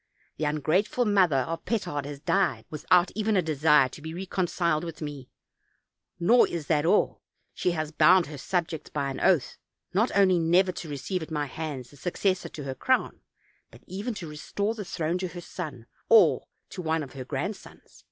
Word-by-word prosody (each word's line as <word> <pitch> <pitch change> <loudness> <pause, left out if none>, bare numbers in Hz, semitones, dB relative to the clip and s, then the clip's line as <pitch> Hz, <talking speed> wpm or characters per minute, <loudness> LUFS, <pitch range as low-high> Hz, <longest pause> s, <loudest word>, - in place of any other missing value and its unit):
The 155 - -1
ungrateful 155 - +1
mother 185 -10 +3
of 165 0 -4
Petard 145 - -2
has 145 -1 -7
died 195 +3 +1
without 175 +4 +3
even 215 -1 +1
a - - +4
desire 150 -2 +4
to 150 - -12
be 160 +2 -6
reconciled 175 -3 -1
with 165 -2 -7
me; 145 -4 -7 0.9
nor 225 +8 +5
is 170 -3 -4
that 155 +1 +1
all, 205 +4 +2 0.3
she - - 0
has 155 -2 -3
bound 180 +2 +5
her 145 -1 -9
subjects 170 -1 -2
by 140 -2 -2
an 135 - -6
oath, 175 -9 +2 0.3
not 220 +6 +3
only 185 -3 +5
never 175 +3 +3
to 170 -3 -8
receive 160 +6 -3
at 160 - -7
my 150 -2 -1
hands 145 -3 -6
a - - -15
successor 185 +3 -1
to 150 - -8
her 135 -1 -4
crown, 260 - 0 0.5
but - - -17
even 210 +5 -4
to 175 -5 -6
restore 200 +8 -3
the 220 -2 -6
throne 170 0 -2
to 185 - -2
her 175 0 -8
son, 150 -10 -7 0.2
or 175 - +5 0.2
to 185 - -6
one 160 -1 0
of 135 - -10
her 130 - -6
grandsons. 195 +10 -6
165 Hz, 185 wpm, -27 LUFS, 150-190 Hz, 0.9 s, nor